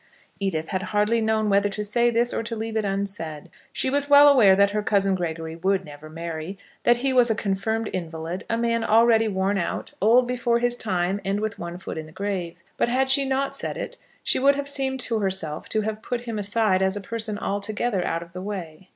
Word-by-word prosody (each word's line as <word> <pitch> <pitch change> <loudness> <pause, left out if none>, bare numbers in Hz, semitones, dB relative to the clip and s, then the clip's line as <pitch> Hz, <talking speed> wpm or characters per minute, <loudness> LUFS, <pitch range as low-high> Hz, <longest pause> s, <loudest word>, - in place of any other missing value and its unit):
Edith 165 -5 -2
had 185 - -1 0.2
hardly 220 +3 +2
known 220 -1 +1
whether 200 0 +3
to 210 +1 -4
say 235 +3 +2
this 235 +1 +1
or - - -1
to 230 0 -5
leave 225 0 -4
it 220 - +1
unsaid. 195 -6 -4 0.2
She - - -1
was 285 +2 0
well 285 0 +8
aware 235 -9 +7
that 200 +1 +4
her 210 +1 0
cousin 200 -2 +2
Gregory 165 -3 -3
would 190 +2 0
never 150 +1 -11
marry, 165 +3 -6 0.3
that 240 0 +5
he 270 - +2
was 245 -2 +5
a 220 - +2
confirmed 215 +3 -1
invalid, 170 +2 -4
a 230 - +1
man 230 0 0
already 225 0 +4
worn 195 0 0
out, 175 - -3
old 235 +5 +5
before 245 -1 +1
his 240 0 0
time, 190 -3 -1
and 195 +1 -1
with 215 +1 -3
one 170 0 -5
foot 180 - -6
in 155 - -7
the - - -14
grave. 190 -2 -4 0.2
But - - +1
had 265 +2 +2
she 275 0 +4
not 270 +1 -1
said - - -4
it, - - -5 0.3
she - - +1
would 280 +2 +4
have 285 0 -3
seemed 270 -2 -1
to 230 -3 0
herself 190 -6 -3
to 215 - +1
have 215 0 -4
put 245 +1 -3
him 230 -3 -4
aside 205 -2 +1
as 190 +1 +1
a - - -5
person 220 0 -3
altogether 205 0 -2
out 165 +1 -2
of 170 +1 -17
the 180 - -6
way. 185 -3 -7
205 Hz, 225 wpm, -24 LUFS, 185-235 Hz, 0.3 s, well